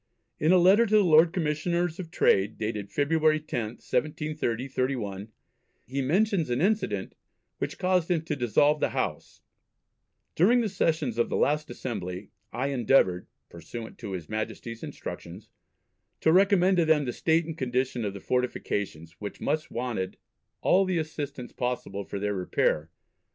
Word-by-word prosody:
In 155 - +3
a 185 - +7
letter 195 +6 +6
to 215 - +2
the 210 - +6
Lord 165 -1 +6
Commissioners 170 +1 -1
of 175 -3 -6
Trade, 100 -8 +2
dated 105 -2 -3
February 155 +1 +2
10th, 120 -6 -5
1730/1, 130 -8 -2 0.6
he 135 +2 -3
mentions 180 - +1
an 120 +1 0
incident 175 - 0 0.5
which - - -3
caused 180 -2 +1
him 170 -3 +1
to 160 -2 -2
dissolve 145 +4 +3
the - - -1
House: - - -4 0.9
"During 235 +9 +4
the 220 - -1
sessions 155 - 0
of 120 - +2
the - - -1
last 150 +1 +1
Assembly 90 -7 -5 0.2
I 130 +3 -2
endeavoured 120 -8 +2 0.2
(pursuant 110 +8 -9
to 105 -5 -6
his 90 -4 -5
Majesty's 110 +1 -5
instructions) 95 +6 -8 0.7
to 160 - +4
recommend 190 -1 +4
to 170 - +4
them 155 -2 +3
the 125 - -3
state 165 0 +2
and 165 -1 -5
condition 125 -3 -1
of 100 -2 -3
the - - -6
Fortifications, 100 -9 -2
which 105 -1 -6
much 155 +2 -1
wanted 115 -6 -3 0.4
all 190 +2 +4
the 185 -2 0
assistance 145 -5 -4
possible 120 -5 -3
for - - -5
their 105 +1 -1
repair 90 -4 0
135 Hz, 150 wpm, -27 LUFS, 110-165 Hz, 0.9 s, a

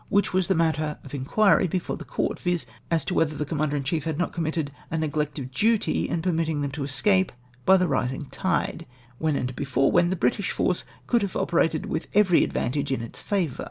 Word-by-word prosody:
which 200 0 +2
Avas 185 -1 +1
the 190 - +2
matter 155 -2 +1
of 140 - -12
inquiry 185 +9 +3
before 180 +1 -2
the - - -8
court, - - -2
viz. 175 -2 -1 0.2
as 165 -4 +1
to - - -2
Avhether 155 -2 +1
the 150 - -1
Commander 150 0 -1
in 140 - -1
chief 155 +2 -1
had 160 -2 -2
not 175 - -1
committed 160 -3 -2 0.2
a 160 - -2
neg 155 -1 -2
lect 150 0 -1
of 130 -2 -5
duty 220 - +1
in 165 - -1
permitting 160 -4 0
them 140 -1 -2
to 145 +2 -5
esca})e 185 +8 +2 0.4
by 190 - +8
the 180 -1 +2
rising 130 -2 -1
tide, 170 0 -2 0.3
Avhen 155 -3 +1
and 125 0 -3
before 135 0 +1
Avhen 175 0 +4
the 185 - 0
British 170 +5 0
force 180 - 0 0.2
could, 240 -2 +2
have 200 -3 -3
operated 165 -2 +1
with - - -3
every 195 -5 +5
advantage 140 +1 -1
in 130 -3 -1
its 115 - -7
favour. 180 -10 -1
160 Hz, 220 wpm, -25 LUFS, 140-180 Hz, 0.4 s, by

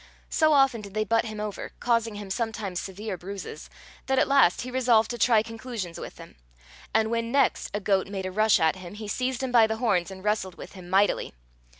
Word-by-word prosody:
So 310 -1 +4
often 270 -5 +4
did 200 -1 -11
they 215 - +1
butt 225 +2 +1
him 215 -1 -6
over, 210 -2 -5
causing 230 -2 +1
him 205 -2 -7
sometimes 220 -5 -3
severe 195 0 -6
bruises, 195 +2 -8 0.4
that 265 0 +1
at - - +3
last 275 -11 +4
he 255 - -6
resolved 240 -3 +3
to 240 - -4
try 225 -3 +4
conclusions 225 -6 -6
with - - -8
them; - - -13 0.5
and 220 0 +2
when 230 0 -1
next 280 +1 +2
a 205 - -2
goat 195 -2 +1
made 195 -1 -5
a 185 - -3
rush 215 +2 +4
at 160 +3 +2
him, 185 +1 -9
he 215 0 -7
seized 255 +4 -2
him 260 - -2
by 230 -2 +6
the 220 0 -2
horns 200 -7 +1
and 190 -1 -10
wrestled 210 -4 -1
with - - -10
him 185 -2 -12
mightily. 195 - +2
215 Hz, 220 wpm, -26 LUFS, 195-235 Hz, 0.5 s, by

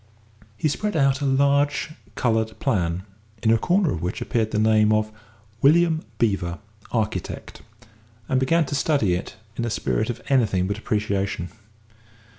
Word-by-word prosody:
He 155 - +1
spread 210 +6 -2
out 135 -1 +2
a - - 0
large 140 +2 +2 0.2
coloured 110 -3 0
plan, 90 -8 0 0.4
in 110 - +4
a 115 - +4
corner 180 - +2
of 80 - -3
which 90 +2 -3
appeared 110 -2 0
the 105 - -2
name 110 0 +4
of 110 0 +1 0.5
"William 160 +2 +4
Beevor, 95 -6 0 0.3
Architect," 105 -6 -3 0.7
and 130 - +2
began 160 +5 +2
to 135 - -6
study 140 - +2
it 90 - -4 0.2
in 120 - -1
a 120 - -1
spirit 110 0 -1
of 120 - -3
anything 110 -9 +2
but 100 +2 -3
appreciation. 100 -5 -1
110 Hz, 150 wpm, -23 LUFS, 100-140 Hz, 0.7 s, in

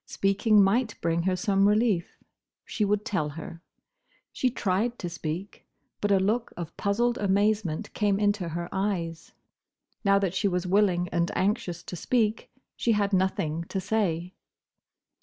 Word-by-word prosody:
Speaking 200 +1 +3
might 220 +3 +1
bring 165 0 0
her 185 - +1
some 195 +2 +2
relief. 210 -5 +1 0.5
She 215 - -2
would 210 0 +1
tell 155 -7 -1
her. 165 +2 -9 0.7
She 255 - +1
tried 230 +1 -1
to 175 - -4
speak; 170 +4 -6 0.3
but 205 - +1
a 200 - +6
look 220 +5 0
of 170 -2 -6
puzzled 235 +4 0
amazement 205 -3 0
came 205 -2 +1
into 205 -4 +1
her 170 +1 -4
eyes. 185 -4 -3 0.7
Now 200 -1 +4
that 195 -3 0
she 200 +2 +1
was 180 -1 -1
willing 180 -2 +2
and 170 0 0
anxious 190 -4 -1
to 180 - -7
speak, 220 +4 0 0.3
she 230 - +1
had 205 -1 0
nothing 170 -4 0
to 190 - -3
say. 185 -3 -1
195 Hz, 150 wpm, -27 LUFS, 175-210 Hz, 0.7 s, a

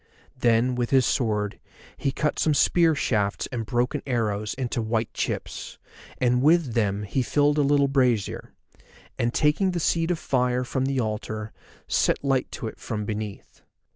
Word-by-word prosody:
Then 120 0 +2
with 120 -1 -1
his 130 -2 +4
sword 105 -5 0 0.4
he 135 - -1
cut 150 +2 -1
some 155 -2 +2
spear 165 +2 +4
shafts 105 -7 0
and 115 -4 -4
broken 125 +5 0
arrows 110 -4 -1
into 125 -2 -2
white 110 0 -1
chips, - - -4 0.4
and 125 0 +2
with 155 -3 +3
them 105 -3 0
he 115 +6 -1
filled 145 +4 +2
a - - +5
little 140 0 +3
brazier, 125 -6 0 0.7
and 120 0 +1
taking 160 +8 +2
the 175 - -1
seed 165 +1 +1
of 175 - +1
fire 125 -3 0
from 130 +1 -1
the 135 -1 0
altar 110 -1 -3 0.3
set - - +1
light 135 -2 0
to - - -5
it 110 - -6
from 105 -3 -4
beneath. 105 -1 -6
125 Hz, 165 wpm, -25 LUFS, 110-140 Hz, 0.7 s, a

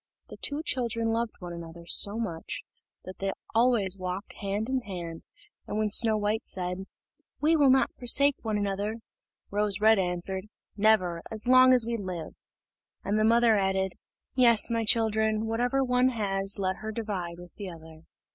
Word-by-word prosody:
The - - -10
two 290 +2 -1
children 230 -2 -1
loved 230 0 -1
one 175 -2 -8
another 170 0 -10
so 200 +4 +4
much, 175 -8 -5 0.4
that 185 - -10
they 195 0 -1 0.2
always 225 -5 +2
walked 185 +2 -5
hand 205 +2 -2
in 260 0 0
hand; 175 -6 -7 0.5
and 210 - -4
when 215 -1 0
Snow 220 0 +4
white 210 +2 -2
said, 180 +1 -3 0.5
"We 315 +2 +3
will 285 -3 +4
not 265 +1 +3
forsake 280 +3 +3
one 215 -2 -2
another," 205 +1 -2 0.6
Rose 205 -1 +1
red 220 0 +5
answered, 185 +1 -1 0.3
"Never, 200 -5 +2
as 220 +1 -2
long 255 0 +7
as 250 -3 +5
we 235 0 -2
live;" 180 -6 -6 0.7
and 205 +2 0
the - - +2
mother 230 0 +4
added, 190 -1 0 0.4
"Yes, 235 -3 +4
my 230 -1 0
children, 220 -1 +1
whatever 245 +4 0
one 250 0 +2
has, 195 -4 -1
let 190 -1 -1
her 220 0 -6
divide 195 -6 -4
with 175 0 -13
the 200 -3 -7
other." 160 -2 -13
210 Hz, 165 wpm, -27 LUFS, 190-230 Hz, 0.7 s, long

